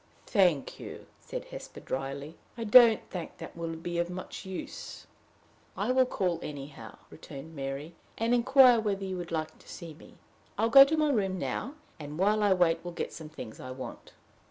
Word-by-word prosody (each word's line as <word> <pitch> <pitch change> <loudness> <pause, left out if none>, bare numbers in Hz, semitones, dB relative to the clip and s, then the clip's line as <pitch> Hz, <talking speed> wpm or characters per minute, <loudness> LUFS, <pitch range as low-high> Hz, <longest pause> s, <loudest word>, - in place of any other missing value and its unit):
"Thank 180 - +2
you," - - -9
said - - -6
Hesper, - - -8
dryly; 140 +4 -4 0.2
"I 230 - -3
don't 225 0 +7
think 175 -3 -6
that - - -9
would 165 -1 -5
be 175 0 -2
of 170 0 0
much 185 +1 -7
use." 190 -1 -7 0.7
"I - - 0
will 255 0 +4
call 180 -8 -1
anyhow," 145 -1 -8
returned 155 +1 -10
Mary, 140 +3 -5 0.2
"and 230 +2 +1
inquire 250 0 +6
whether 200 -3 -1
you 190 -1 -3
would 175 -1 -6
like 155 -1 -3
to - - -18
see 170 -3 -8
me. 155 - -16 0.4
I 210 - 0
will 230 - +2
go 275 +2 +11
to 315 +3 0
my 305 -1 +3
room 195 -6 0
now, 265 - -3 0.2
and 150 0 -7
while 210 +4 +3
I 205 -1 +3
wait 175 -3 +3
will 175 - -5
get - - -4
some 155 -2 -8
things 130 -8 -9
I 130 - -8
want." 130 0 -8
175 Hz, 190 wpm, -29 LUFS, 155-220 Hz, 0.7 s, go